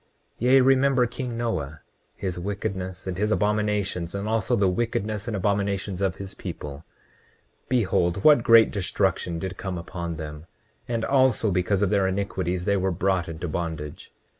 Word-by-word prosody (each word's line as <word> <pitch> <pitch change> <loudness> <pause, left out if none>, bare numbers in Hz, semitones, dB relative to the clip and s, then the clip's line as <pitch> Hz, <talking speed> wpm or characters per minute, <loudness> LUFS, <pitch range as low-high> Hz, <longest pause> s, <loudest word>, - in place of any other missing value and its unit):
29:18 125 - +1
Yea, 135 +1 +7
remember 135 -1 +4
king 120 0 -5
Noah, 85 -11 -3 0.3
his 90 -2 -4
wickedness 95 -1 -4
and 95 -1 -4
his 105 +1 +1
abominations, 105 -4 0
and 100 +1 -3
also 115 +2 +1
the 100 -4 +3
wickedness 105 +1 -1
and 110 -3 -2
abominations 100 -1 -1
of 95 -3 +1
his 100 -1 -8
people. 70 +1 -7 0.9
Behold 95 -6 +1
what 150 -5 +7
great 115 -1 +6
destruction 95 -3 -1
did 95 +3 -5
come 95 -2 -4
upon 85 -1 -5
them; 75 0 -8 0.4
and 115 -2 -1
also 130 -6 +3
because 95 +2 +1
of 100 - +1
their 100 -2 +3
iniquities 95 -2 -2
they 100 - +2
were 95 0 +1
brought 95 0 0
into 80 +2 -5
bondage. 80 -2 -5
100 Hz, 160 wpm, -25 LUFS, 90-110 Hz, 0.9 s, Yea